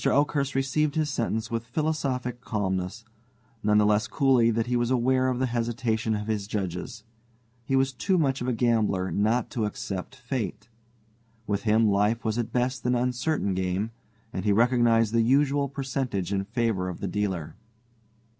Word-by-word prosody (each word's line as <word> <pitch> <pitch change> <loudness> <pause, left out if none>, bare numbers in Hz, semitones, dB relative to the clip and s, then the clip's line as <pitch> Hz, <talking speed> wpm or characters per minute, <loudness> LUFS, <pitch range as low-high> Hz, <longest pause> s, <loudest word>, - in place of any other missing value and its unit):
Oakhurst 140 -1 +1
received 145 +3 +1
his 155 -2 0
sentence 110 -3 -2
with 115 -1 -1
philosophic 130 -3 -2
calmness, 95 -1 -2 0.6
none 105 -1 +3
the 105 - +5
less 105 +1 +2
coolly 130 -5 +3
that 115 0 +1
he 125 0 -1
was 120 0 +1
aware 130 +1 +2
of 130 -1 0
the 130 - +1
hesitation 115 -2 -1
of 105 0 -3
his 105 -2 -2
judges. 100 +1 -4 0.6
He 135 - 0
was 135 0 +2
too 185 +9 +1
much 135 -6 +1
of 125 - -2
a - - +2
gambler 110 -6 +1
not 110 +4 +1
to 115 -3 -1
accept 100 +2 -5
Fate. 120 -5 -4 0.8
With 100 0 -2
him 110 +1 +4
life 105 +4 +1
was 110 +1 0
at 120 - -2
best 125 +1 -1
an 125 - +3
uncertain 125 -2 0
game, 95 +4 -1 0.4
and 95 - -3
he 105 - +2
recognized 115 0 +3
the 115 - +4
usual 140 +3 +2
percentage 130 -8 -2
in 95 0 -1
favor 110 -4 -1
of 90 - -6
the 100 - -3
dealer. 95 -5 -2
115 Hz, 170 wpm, -26 LUFS, 105-130 Hz, 0.8 s, the